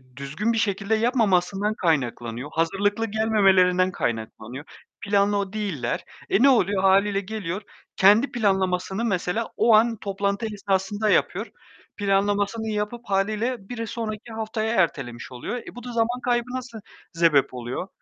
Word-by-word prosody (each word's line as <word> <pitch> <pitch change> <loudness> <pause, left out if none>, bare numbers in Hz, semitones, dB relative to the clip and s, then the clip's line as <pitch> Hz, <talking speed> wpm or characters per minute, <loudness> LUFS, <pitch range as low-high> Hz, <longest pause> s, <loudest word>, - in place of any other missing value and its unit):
düzgün 155 - -2
bir - - -1
şekilde 200 0 0
yapmamasından 210 -4 +1
kaynaklanıyor. 125 - -1
Hazırlıklı 200 +7 0
gelmemelerinden 195 -4 +3
kaynaklanıyor. 120 +2 -4 0.4
Planlı 200 -1 +1
değiller. 175 - -2 0.3
E, 195 - +3
ne 275 - +8
oluyor? 200 -6 +3
Hâliyle 195 +1 +4
geliyor 200 -2 -4 0.3
kendi 210 +8 +5
planlamasını 190 -1 0
mesela 200 +2 -1
o 230 - +4
an 225 +1 +3
toplantı 200 +2 -2
esnasında 200 +1 -1
yapıyor. - - +1 0.5
Planlamasını 205 +2 0
yapıp 210 +2 -3
hâliyle 210 +3 -1
bir 230 -2 -4
sonraki 225 0 -5
haftaya 220 +1 -2
ertelemiş 130 - -1
oluyor. 125 - -5
E, 235 - -10
bu 245 - -9
da 245 - -6
zaman 235 +2 0
kaybına 250 +1 -1
se 235 -2 -11 0.4
sebep 165 -6 +3
oluyor. 125 +8 -5
200 Hz, 130 wpm, -24 LUFS, 185-220 Hz, 0.5 s, ne